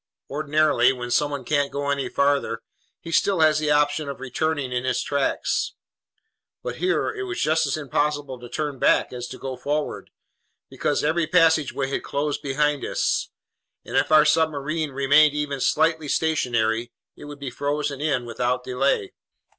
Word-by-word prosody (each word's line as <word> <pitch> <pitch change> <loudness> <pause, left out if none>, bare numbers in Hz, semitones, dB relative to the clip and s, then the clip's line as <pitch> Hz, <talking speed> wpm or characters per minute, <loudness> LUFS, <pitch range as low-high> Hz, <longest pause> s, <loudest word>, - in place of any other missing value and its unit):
Ordinarily, 150 -3 +3
when 120 -1 -6
someone 140 0 0
can't 145 0 +1
go 140 0 -2
any 140 -2 -1
farther, 140 -5 0 0.4
he 165 - -8
still 190 +1 +2
has 155 -1 +4
the 155 -1 -1
option 150 0 +2
of 140 - -6
returning 135 +1 -2
in 125 0 -1
his 130 -1 0
tracks. 140 -1 -1 0.9
But - - -4
here 370 +1 0
it 400 -3 -5
was 360 -2 -4
just 160 0 +2
as 140 - -1
impossible 145 -2 -2
to 120 0 -10
turn 145 0 -3
back - - +3
as 125 0 -5
to 130 - -9
go 135 -1 -5
forward, 145 +4 -3 0.6
because - - -1
every 160 +2 +1
passageway 160 -6 +3
had 140 - -2
closed 145 +1 -2
behind 145 +1 0
us, - - 0 0.6
and - - -6
if - - +2
our 155 -1 +7
submersible 155 -1 +1
remained 145 +2 +4
even 145 -2 -2
slightly 160 +1 +2
stationary, 120 -7 0 0.2
it - - -12
would 145 0 -9
be 135 -2 -5
frozen 145 +1 -2
in 145 -5 0
without 125 +1 -1
delay. 125 -5 0
145 Hz, 160 wpm, -24 LUFS, 130-155 Hz, 0.9 s, our